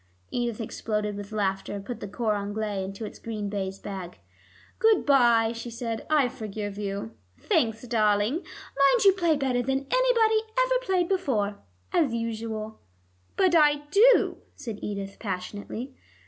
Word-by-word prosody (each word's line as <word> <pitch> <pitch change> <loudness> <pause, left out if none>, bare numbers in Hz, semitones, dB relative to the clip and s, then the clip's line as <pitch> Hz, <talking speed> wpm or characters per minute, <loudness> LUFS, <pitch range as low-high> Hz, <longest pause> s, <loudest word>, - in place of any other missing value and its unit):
Edith 240 -2 -2
exploded 210 -2 -2
with 200 +1 -7
laughter, 195 -2 -1
and 200 0 -7
put 245 - -5
the 205 - -6
cor 215 +2 -1
anglais 205 -1 -2
into 195 +3 -6
its - - -9
green 215 -3 -4
baize 195 -1 -3
bag. 190 -4 -7 0.6
"Good 445 -3 +4
by," 235 -5 +5
she 230 +1 -6
said, 230 -1 -5
"I 300 -4 +4
forgive 215 -5 -5
you." 195 - -4 0.3
"Thanks, 240 - +1
darling. 215 -1 +2
Mind 375 - +1
you 390 - +8
play 340 -4 +2
better 265 -3 0
than 270 +2 -1
anybody 465 -3 +4 0.2
ever - - +1
played 370 -4 +2
before, 220 - 0 0.3
as 285 -9 +2
usual." 220 -1 -4 0.6
"But 370 -2 +4
I 295 -3 +5
do," 475 +7 +5 0.2
said 230 -7 -6
Edith 200 -1 -5
passionately. 205 +6 -5
230 Hz, 145 wpm, -27 LUFS, 205-290 Hz, 0.6 s, you